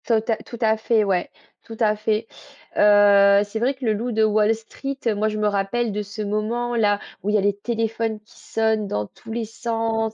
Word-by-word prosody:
Tota 225 -1 +2
tout 235 - -10
à 220 -1 +3
fait 220 0 +2
ouais, 190 -3 0 0.3
tout 225 - -10
à 215 -2 +3
fait. 215 +1 -1 0.5
Heu, 200 -1 +6
c'est 210 +2 -5
vrai 260 +4 +1
que 260 -1 -7
Le 220 - +2
loup 235 +4 -3
de 220 -1 +2
Wall 215 +1 +3
Street, 270 +5 -7
heu, 225 - +2
moi 215 +1 0
je 215 - -4
me 210 0 +1
rappelle 205 +3 0
de 210 +1 -2
ce 205 +1 -7
moment-là, 215 0 0 0.2
où 205 - -3
il 210 - +2
y - - +6
a - - +2
les 200 0 +1
téléphones 225 0 -2
qui 215 - -21
sonnent 220 -2 0
dans 105 - -2
tous 225 - -13
les 230 0 -2
sens 225 0 -2
220 Hz, 220 wpm, -22 LUFS, 210-225 Hz, 0.5 s, Heu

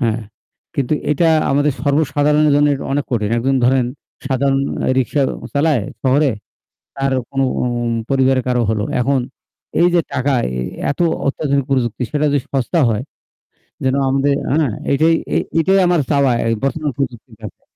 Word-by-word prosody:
হ্যাঁ, 115 -2 0 0.5
কিন্তু 140 +1 0 0.2
এটা 160 +3 +2 0.2
আমাদের 145 +1 +2
সর্বসাধারণের 150 0 +2
জন্য 145 0 +4
এটা 135 - -6
অনেক 145 +1 0
কঠিন। 110 -4 -1
একজন 135 +3 +1
ধরেন 130 0 +3 0.4
সাধারণ 135 0 +1 0.2
অ্যা - - 0
রিক্সা 140 +3 0 0.3
চালায় 145 -4 +2 0.2
শহরে। 135 +2 +3 0.7
তারও 135 -1 0
কোনো 135 0 0 0.2
উম 120 -1 -1 0.2
পরিবারের 130 -1 +2
কারও 125 -1 +1
হল। 110 -1 -1 0.2
এখন 135 +2 +1 0.6
এই 175 - +5
যে 175 - +5
টাকা, 140 +1 +1 0.2
এ - - 0 0.3
এত 145 - -5 0.3
অত্যাধুনিক 140 -1 0
প্রযুক্তি, 125 -3 0
সেটা 150 0 0
যদি - - +3 0.2
সস্তা 135 +5 0
হয় 110 0 -1 0.8
যেন 130 0 +2
আমদে 135 +1 +1 0.2
অ্যা 155 +3 +2 0.3
এটাই 160 +4 +3 0.2
এ - - +4 0.2
এটাই 190 +4 +3
আমার 175 -2 +2
চাওয়া 140 -3 +3
এ - - -1 0.2
বর্তমান 150 +2 -1
প্রযুক্তির 120 -4 -5
কাছে। 105 - -9
135 Hz, 155 wpm, -18 LUFS, 125-145 Hz, 0.8 s, এই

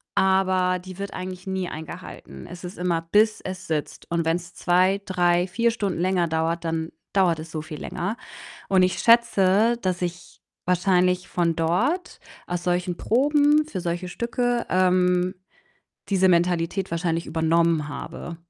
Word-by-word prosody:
aber 185 -1 +2
die 185 0 -10
wird 200 0 -5
eigentlich 185 0 -6
nie 190 -1 -2
eingehalten. 155 - -9
Es 175 +1 -10
ist 180 +1 -7
immer: 175 -2 0
Bis 215 +1 +3
es 185 0 -7
sitzt. 155 -2 -4
Und 170 -1 0
wenn's 170 +1 -2
2, 185 +3 +2
3, 175 -1 +2
4 230 +5 +1
Stunden 200 -7 -2
länger 180 -1 +1
dauert, 165 +1 -1
dann 165 0 -2 0.2
dauert 180 -5 +2
es 160 0 -8
so 155 - -4
viel 155 -1 -9
länger. 195 +6 -3 0.5
Und 190 -1 +4
ich 185 - +1
schätze, 230 -2 +4
dass 185 -1 -1
ich 175 0 -5 0.3
wahrscheinlich 180 0 +2
von 170 -2 0
dort 235 - 0 0.3
aus 175 0 -3
solchen 180 0 0
Proben 295 - +3
für 190 -12 -5
solche 175 +1 -3
Stücke, 240 +4 -1
ähm, 180 0 +2 0.7
diese 190 -1 +3
Mentalität 175 +1 +1
wahrscheinlich 165 0 -1
übernommen 165 -1 +1
habe 170 +3 -7
180 Hz, 150 wpm, -24 LUFS, 170-190 Hz, 0.7 s, Und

